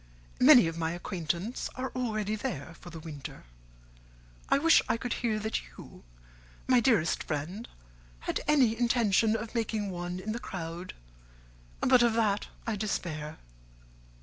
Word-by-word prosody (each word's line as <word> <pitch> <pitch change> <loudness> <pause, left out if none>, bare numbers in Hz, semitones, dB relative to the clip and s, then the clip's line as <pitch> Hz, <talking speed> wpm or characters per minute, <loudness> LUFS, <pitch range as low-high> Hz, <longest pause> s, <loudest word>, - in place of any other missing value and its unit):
Many 255 - +8
of 165 0 -3
my 160 0 -1
acquaintance 175 - -3
are 260 +1 -3
already 215 -4 -1
there 165 -6 -4
for 175 - -11
the 165 -1 -8
winter: 155 -4 -8 1.1
I - - +5
wish 325 +4 +6
I 230 - +2
could 245 0 -3
hear 225 -3 +1
that 220 +1 -2
you, - - -13 0.6
my 255 -1 +5
dearest 225 -11 +2
friend, 170 +10 -4 0.5
had - - -2
any 260 -7 +4
intention 230 -3 +3
of 225 0 -5
making 220 -4 -1
one 175 0 -4
in 210 +3 -4
the 230 - -3
crowd, 175 -3 -6 0.9
but 255 -1 +5
of 235 -1 +4
that 210 -3 +1 0.2
I 225 -2 -1
despair. 160 -7 -3
215 Hz, 145 wpm, -30 LUFS, 175-235 Hz, 1.1 s, Many